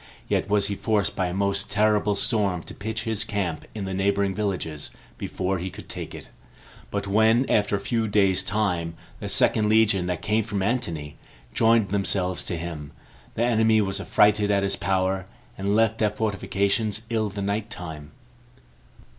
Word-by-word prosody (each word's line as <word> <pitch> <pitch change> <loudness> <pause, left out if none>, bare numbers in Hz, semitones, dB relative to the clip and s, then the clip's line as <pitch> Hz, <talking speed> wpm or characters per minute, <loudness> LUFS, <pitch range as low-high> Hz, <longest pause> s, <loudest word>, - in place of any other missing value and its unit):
Yet - - 0
was 100 -1 +3
he 100 - -1
forced 105 0 0
by 95 - 0
a - - -3
most 100 +1 0
terrible 105 -1 +2
storm 100 -6 +1
to - - -10
pitch 110 +2 -4
his 110 -2 -1
camp 100 -7 -3
in 105 -3 -4
the 95 - -4
neighboring 100 0 +1
villages 90 -7 -3 0.3
before 95 0 -2
he 90 +2 -4
could - - -11
take - - -6
it. - - -10 0.6
But 100 0 -3
when, 110 +5 +3
after 105 -1 +2
a - - -1
few 110 +3 -1
days' 100 -3 +3
time, 90 -6 -1 0.2
the - - -5
second 105 -1 +3
legion, 105 -4 +3
that 90 -2 -3
came 110 +1 +1
from 100 -2 -2
Antony, 85 - -2 0.4
joined 115 - +3
themselves 95 -2 0
to 85 - -2
him, 80 -3 -6 0.4
the 115 - +1
enemy 110 -2 +3
were 100 -2 0
affrighted 105 0 +3
at 100 -1 +2
his 100 0 +1
power, 95 -1 0 0.3
and 100 +1 0
left 115 0 +2
their 105 - +3
fortifications 105 +1 -1
in 110 -2 0
the 100 0 -5
night 100 +2 -2
time. 80 -7 -6
100 Hz, 170 wpm, -25 LUFS, 95-110 Hz, 0.6 s, was